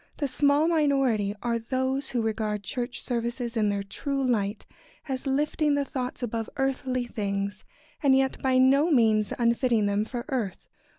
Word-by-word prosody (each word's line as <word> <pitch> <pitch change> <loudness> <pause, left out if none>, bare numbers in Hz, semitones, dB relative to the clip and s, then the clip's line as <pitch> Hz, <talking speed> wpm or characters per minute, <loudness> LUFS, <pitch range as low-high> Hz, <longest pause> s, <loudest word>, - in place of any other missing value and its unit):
] - - -36
The 285 - -1
small 285 +3 +3
minority 270 -10 +2
are 235 -1 0
those 260 +3 -1
who 240 -3 -1
regard 215 -2 -2
church 245 +5 -4
services 235 0 -3
in 215 -2 +2
their 200 -1 -1
true 275 +7 -3
light 210 -4 0 0.4
as 265 0 -3
lifting 295 +2 +1
the 285 0 0
thoughts 255 -2 -4
above 230 -1 -3
earthly 260 -2 -1
things, 200 -3 -3 0.4
and 270 -2 +5
yet 265 0 0
by 260 -1 +2
no 275 +5 +5
means 220 - +3
unfitting 235 -2 +2
them 205 +1 +1
for 240 +1 -5
earth. 230 - -3
245 Hz, 165 wpm, -27 LUFS, 220-270 Hz, 0.4 s, and